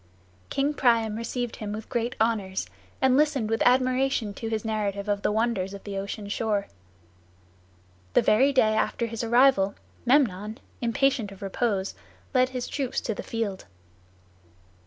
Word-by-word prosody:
King 280 +2 0
Priam 230 -6 +2
received 235 +1 -3
him 210 -1 -5
with 215 +1 -6
great 240 0 -2
honors, 210 -4 0 0.4
and 260 -1 +5
listened 275 -6 +2
with 225 - 0
admiration 255 -3 +2
to 225 - -6
his 220 0 -2
narrative 205 -2 -2
of 205 -1 0
the - - +1
wonders 210 -3 0
of 200 - -11
the 200 -1 -6
ocean 200 +2 -4
shore. 205 -1 0 1.5
The - - +4
very 260 +7 +4
day 220 -5 +4
after 220 +2 0
his 230 0 -4
arrival, 235 -4 +4 0.3
Memnon, 225 -5 +2 0.2
impatient 235 -2 +1
of 195 0 -11
repose, 195 -1 -1 0.4
led 255 -1 +4
his 255 -1 -4
troops 270 -4 -2
to 225 - -2
the - - -6
field. 220 -4 -3
225 Hz, 150 wpm, -26 LUFS, 205-250 Hz, 1.5 s, and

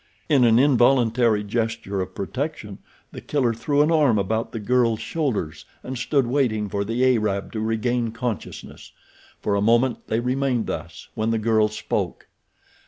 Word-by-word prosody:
In 135 -5 +5
an 115 -1 +5
involuntary 120 -4 +3
gesture 110 -2 -2
of 95 0 -6
protection 125 -1 -5 0.3
The - - -9
Killer 130 -6 0
threw 145 +5 +1
an 155 - +1
arm 145 -9 +3
about 110 +3 -1
the 115 - -5
girl's 115 0 +1
shoulders 140 - -3 0.2
and 130 - -5
stood 130 +2 +1
waiting 120 -5 0
for 100 +1 -1
the 115 +5 0
Arab 100 -3 -2
to 110 - -4
regain 115 +2 -1
consciousness. 115 -2 -6 0.5
For 105 - -1
a 100 - +1
moment 120 +3 +2
they 110 - 0
remained 125 -1 0
thus, - - -7
when 110 +1 -1
the 115 - +1
girl 110 -1 +2
spoke. 110 - -3
115 Hz, 160 wpm, -23 LUFS, 110-130 Hz, 0.5 s, In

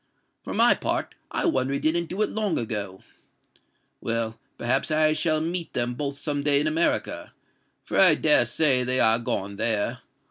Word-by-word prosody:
For - - -7
my - - +5
part, - - -3 0.2
I - - -3
wonder 130 +1 0
he 140 - -2
didn't 170 +2 -1
do 200 +4 -2
it - - -3
long 210 -5 -2
ago. 105 -4 -5 1.0
Well—perhaps 115 +3 -3
I 155 0 +2
shall 155 0 0
meet 170 +1 -4
them 120 0 -1
both 140 +2 -5
some 145 0 -3
day 140 -1 +3
in 150 - -1
America; 160 +2 -1 0.5
for - - -2
I - - +7
dare 295 - +5
say 135 -5 +3
they 130 +1 +1
are 110 0 +4
gone 100 -3 -4
there. 110 -2 0
140 Hz, 170 wpm, -24 LUFS, 115-155 Hz, 1.0 s, I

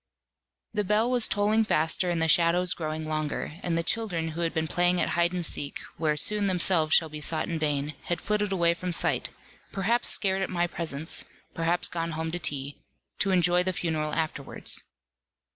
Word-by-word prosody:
The 210 -1 0
bell 215 +5 +2
was 245 -3 +4
tolling 210 +2 +2
faster, 165 -2 +1
and 170 -1 0
the 160 - +2
shadows 175 +2 +4
growing 155 -1 -4
longer, 155 +1 -3
and 170 -2 -1
the 165 - 0
children 175 -5 -1
who 165 +2 -5
had 165 -1 0
been 160 0 -2
playing 175 +2 +2
at - - +1
hide 170 0 +1
and 180 -2 -3
seek, 145 -1 -4 0.2
where 150 -1 0
soon 205 +6 +2
themselves 175 -4 +3
shall 160 - +3
be 150 -1 -8
sought 155 +1 -1
in 165 -2 -3
vain, 150 -1 -1
had 175 - -2
flitted 210 -1 -1
away 170 -3 +2
from 180 +1 -4
sight, - - +1 0.4
perhaps 220 +5 +1
scared 195 -1 +2
at 190 - -2
my 175 -1 0
presence, 160 -3 -2 0.3
perhaps 170 +2 +1
gone 165 -1 -3
home 160 +1 -3
to 175 - -3
tea, 140 -3 -3 0.4
to 200 - +1
enjoy 180 -1 +3
the 185 +1 -1
funeral 155 -3 -2
afterwards. 155 -3 0
170 Hz, 190 wpm, -27 LUFS, 160-185 Hz, 0.4 s, was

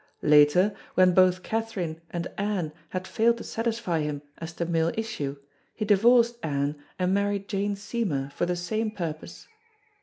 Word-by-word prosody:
Later, 150 +7 +5 0.2
when 185 -1 +5
both 185 0 +4
Katherine 195 -8 -3
and 170 -1 -3
Anne 195 -6 -1 0.2
had 185 0 -4
failed 230 +1 +2
to - - -7
satisfy 225 -7 -2
him 150 -1 -3 0.2
as 165 0 -6
to 170 - -3
male 165 0 +1
issue, 185 -11 -3 0.4
he 215 - -2
divorced 235 +3 +4
Anne 145 -1 -1 0.2
and 185 0 +1
married 200 0 0
Jane 205 0 -1
Seymour 195 - -2
for 175 - -1
the 180 - 0
same 215 +6 -2
purpose. 165 -7 -6
185 Hz, 155 wpm, -27 LUFS, 160-215 Hz, 0.4 s, Later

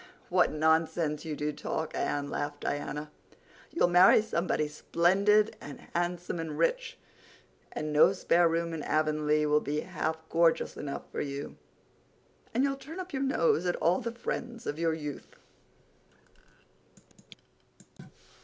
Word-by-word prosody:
"What 180 0 +3
nonsense 160 0 +1
you 155 -2 -3
do 150 +1 -2
talk, 155 +2 -4
Anne," 145 0 -1
laughed 145 0 -4
Diana. 150 +1 -4 0.6
"You'll 335 - +2
marry 180 +4 +6
somebody 170 -7 -1
splendid 195 +7 +2
and 145 - -9
handsome 175 0 -2
and 160 -2 -4
rich—and 485 - -5
no 150 +5 +6
spare 175 -3 +3
room 165 0 -1
in 160 - -4
Avonlea 155 0 +1
will 150 0 +3
be 150 +1 -2
half 160 -3 -3
gorgeous 165 0 +2
enough 140 -1 -5
for - - -3
you—and 145 - -7
you'll 275 -1 0
turn 315 +6 -9
up 370 -3 -7
your 265 - -2
nose 180 - +2
at 175 - +1
all 175 +6 +1
the 235 -1 -3
friends 235 0 -5
of 150 - -4
your 165 -1 +1
youth." 150 -2 -7
165 Hz, 130 wpm, -29 LUFS, 150-185 Hz, 0.6 s, marry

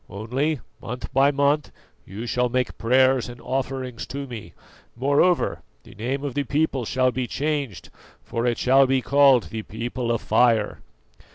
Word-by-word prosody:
Only, 130 +9 -2 0.2
month 125 +2 -7
by 135 +2 +5
month 140 0 +1 0.4
you 105 +5 -6
shall 125 +1 0
make 125 0 -2
prayers 130 +1 +3
and 120 0 -10
offerings 130 -1 -4
to 140 +1 -5
me; 120 -5 -9 0.4
moreover, 145 +8 +2 0.2
the - - -15
name 130 +7 -3
of 140 -3 -3
the 145 - 0
people 140 -2 0
shall 130 +2 +1
be 125 -1 -3
changed, 145 - -3 0.3
for 115 +1 -2
it 120 - +1
shall 135 +1 +4
be 130 -1 +1
called 140 -3 +4
the 110 - -4
People 120 +3 -4
of 115 - -1
Fire. 115 -4 +2
130 Hz, 160 wpm, -24 LUFS, 120-140 Hz, 0.4 s, by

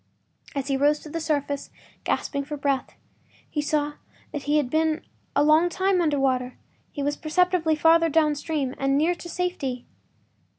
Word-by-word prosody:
As 275 -1 -2
he 275 -1 +1
rose 290 +2 +3
to 310 - -10
the 330 - -2
surface, 285 -2 -1 0.4
gasping 280 -1 -1
for 295 +1 -6
breath, 275 -2 -1 0.5
he 295 - -2
saw 295 0 0 0.4
that 295 - -4
he 295 +1 +3
had 290 -4 +2
been 315 +3 0 0.3
a 285 - +4
long 310 +3 +5
time 375 0 +1
under 300 -4 +1
water; 255 -2 0 0.3
he 285 - -4
was 290 +1 0
perceptibly 335 0 +2
farther 330 +2 +5
downstream—nearer 295 0 +1
to 345 0 -9
safety. 305 -9 -3
300 Hz, 155 wpm, -25 LUFS, 280-325 Hz, 0.5 s, long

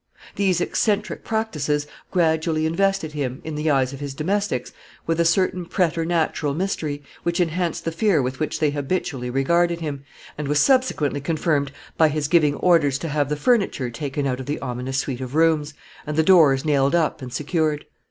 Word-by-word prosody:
These 185 -3 +1
eccentric 210 +3 0
practices 150 -10 -1 0.2
gradually 160 -2 +1
invested 195 0 0
him, 135 -4 -3
in 160 - -5
the 150 +1 -1
eyes 135 -2 +2
of 135 - -8
his 140 -2 -5
domestics, 180 -4 -1 0.3
with 165 0 -1
a 170 - +3
certain 180 +1 +2
preternatural 165 -4 0
mystery, 155 -5 -2 0.2
which 170 +1 -1
enhanced 175 0 -1
the 165 - -1
fear 190 -1 +2
with 130 0 -2
which 155 - -2
they 155 -2 +2
habitually 145 -3 -2
regarded 170 +6 +1
him, 145 -4 -5 0.4
and 150 - -3
was 145 +1 +2
subsequently 255 - +2
confirmed 150 -2 0 0.3
by 160 - +5
his 150 -1 -1
giving 150 -3 +3
orders 155 -7 +3
to 165 +3 -5
have 145 -1 0
the 150 - 0
furniture 150 - +1
taken 140 +3 -3
out 130 -1 -1
of 130 - -7
the 145 - -2
ominous 125 +2 -4
suite 135 -2 -2
of 130 +2 -6
rooms, 155 -2 +2 0.3
and 150 0 -3
the 160 - +4
doors 155 -6 +5
nailed 140 0 +2
up 165 -4 0
and 125 -1 -7
secured. 150 +1 -1
155 Hz, 180 wpm, -22 LUFS, 140-170 Hz, 0.4 s, by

